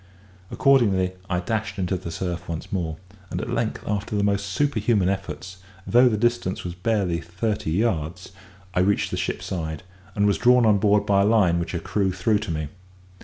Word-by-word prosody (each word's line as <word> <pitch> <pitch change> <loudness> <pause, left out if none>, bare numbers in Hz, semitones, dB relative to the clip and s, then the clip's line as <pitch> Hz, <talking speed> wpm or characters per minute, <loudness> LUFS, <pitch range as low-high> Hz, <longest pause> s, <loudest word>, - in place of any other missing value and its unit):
Accordingly 100 -9 +3 0.2
I 90 -1 0
dashed 110 +4 -3
into 95 0 -1
the 90 -1 -6
surf 85 +1 -4
once 80 -1 -5
more; 80 -4 -2 0.3
and 90 - -3
at 120 - -4
length, 115 -2 -2
after 105 +1 -2
the 100 - +1
most 100 0 0
superhuman 110 -4 +1
efforts, 95 -1 -5 0.3
though 125 +2 +5
the 110 - 0
distance 120 -4 0
was 90 - -4
barely 90 -3 0
thirty 95 +2 -3
yards, 90 -2 -1 0.4
I - - +1
reached 100 +2 +2
the - - -1
ship's - - -3
side, 80 -3 -4 0.3
and 100 - +2
was 100 -1 +2
drawn 125 -1 +5
on 105 -2 +4
board 105 0 +3
by 100 -1 +3
a - - +3
line 100 -6 +3
which 85 - -4
her 85 - -1
crew 95 +3 0
threw 95 +4 +1
to 105 - -6
me. 75 -2 -3
100 Hz, 190 wpm, -24 LUFS, 90-110 Hz, 0.4 s, though